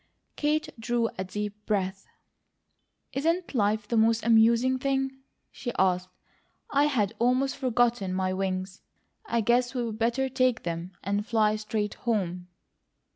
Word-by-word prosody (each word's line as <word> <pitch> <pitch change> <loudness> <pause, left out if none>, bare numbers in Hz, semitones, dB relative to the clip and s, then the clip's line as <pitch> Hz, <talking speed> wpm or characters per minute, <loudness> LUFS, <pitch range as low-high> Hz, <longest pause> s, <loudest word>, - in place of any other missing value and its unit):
Kate 300 +1 0
drew 230 0 0
a - - 0
deep 210 +2 -5
breath. 195 -2 -1 1.1
"Isn't 330 +5 0
life 210 -2 +1
the 235 - -1
most 225 0 +3
amusing 235 +3 +4
thing?" 270 0 0 0.4
she 245 - -5
asked. 185 -1 +2 0.6
"I 285 +1 +4
had 230 -8 +1
almost 255 +3 +2
forgotten 240 -6 +1
my 185 0 0
wings. 185 0 -3 0.5
I 235 - +1
guess 245 +3 +2
we'd 230 -3 -2
better 240 +4 +1
take 255 -2 +1
them, 170 +2 -4
and 200 +1 0
fly 215 -2 +2
straight 215 -1 -2
home." 180 -6 -2
225 Hz, 130 wpm, -27 LUFS, 200-250 Hz, 1.1 s, amusing